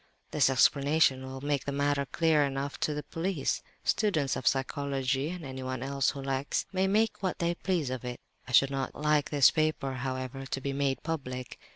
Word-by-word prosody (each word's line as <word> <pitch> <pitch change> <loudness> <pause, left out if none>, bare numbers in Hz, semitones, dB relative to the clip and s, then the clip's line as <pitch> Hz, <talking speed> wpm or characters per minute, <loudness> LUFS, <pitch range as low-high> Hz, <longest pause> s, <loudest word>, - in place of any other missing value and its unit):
"This 145 -3 +4
'explanation' 140 +1 +3
will 130 0 -7
make 145 -1 -1
the 140 - -2
matter 140 0 0
clear 160 -1 +3
enough 140 0 -3
to 150 - 0
the 150 - -4
police. 165 -4 -2 0.2
Students 155 - +1
of 130 - -3
psychology, 135 0 0
and 175 -3 -6
anyone 130 -1 -4
else 135 0 +1
who 140 - -5
likes, 135 +1 -1
may 190 0 +2
make 215 +3 +1
what 185 -2 -1
they 170 0 0
please 170 -6 -1
of 130 -1 -4
it. 125 -1 -5 0.3
I - - -7
should 135 +2 +5
not 135 -1 -3
like 150 -1 +1
this 145 -3 +6
paper, 155 -4 0
however, 130 +1 -4
to 135 - -2
be 140 +1 -3
made 135 -1 -1
public. 130 -6 -4
140 Hz, 190 wpm, -29 LUFS, 130-155 Hz, 0.3 s, this